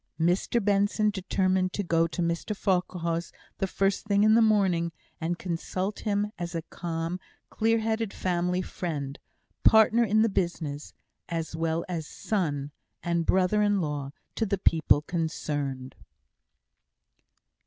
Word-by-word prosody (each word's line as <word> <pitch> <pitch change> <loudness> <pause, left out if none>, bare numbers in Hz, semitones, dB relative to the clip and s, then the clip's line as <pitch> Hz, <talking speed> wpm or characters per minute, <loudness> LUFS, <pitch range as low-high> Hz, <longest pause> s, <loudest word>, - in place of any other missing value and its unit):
Mr 180 +6 +1
Benson 205 +1 +2
determined 185 -1 0
to 205 - -1
go 165 -2 +2
to 175 +1 -2
Mr 170 +5 -1
Farquhar's 175 -3 -1 0.3
the 195 - 0
first 195 +2 0
thing 200 0 +3
in 215 0 +6
the 230 - +6
morning, 190 -6 +3 0.3
and 170 +1 -2
consult 185 +3 -3
him 210 -1 -1
as 175 0 -4
a 165 - -2
calm, 165 +1 -4 0.3
clear 225 +1 +2
headed 220 -1 -1
family 180 0 0
friend 145 -8 -4 0.4
partner 220 +2 +6
in 215 0 +3
the - - +4
business, 170 -7 -2 0.4
as 165 -2 -3
well 165 +1 -1
as 165 -4 -4
son 145 -9 -2 0.3
and 170 -1 0
brother 190 +3 +3
in 205 -1 +3
law 145 -4 -2 0.2
to - - -1
the 200 -2 0
people 160 -4 +3
concerned. 145 -6 -3
180 Hz, 135 wpm, -28 LUFS, 165-205 Hz, 0.4 s, in